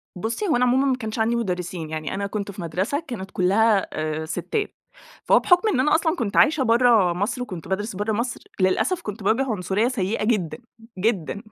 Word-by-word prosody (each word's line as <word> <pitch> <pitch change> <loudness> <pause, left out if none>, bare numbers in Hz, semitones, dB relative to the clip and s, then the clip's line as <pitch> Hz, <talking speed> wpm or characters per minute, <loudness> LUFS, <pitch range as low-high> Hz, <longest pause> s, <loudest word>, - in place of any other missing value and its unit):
بُصي، 225 - -3
هو 315 - +2
أنا 250 +1 +3
عمومًا 260 +2 +3
ما 265 -2 +2
كانش 220 -1 -5
عندي 225 +2 +2
مدرِّسين، 180 -6 -3
يعني 155 -1 -4
أنا 200 +1 -2
كنت 200 0 -4
في 200 0 -8
مدرسة 185 - -1
كانت 195 -7 -6
كلّها 200 +3 +3
آآ، 155 0 -3
ستات، 415 - -3 0.5
فهو - - +5
بحُكم 355 +4 +3
إن 275 - +1
أنا 300 +4 +3
أصلًا 320 +1 +1
كنت 230 - -2
عايشة 300 -3 +5
برّه 230 -6 +4
مصر 205 +8 -2
وكنت 185 -10 -6
بادرُس 195 +2 -3
برّه 205 +3 -1
مصر، 235 +3 -2 0.2
للأسف 190 - +1
كنت 210 - -7
باواجِه 230 +7 +2
عنصرية 200 +2 0
سيِّئة 220 -4 -1
جدًا 210 -8 0 0.4
جدًا. 200 -2 -1
215 Hz, 195 wpm, -23 LUFS, 185-245 Hz, 0.5 s, فهو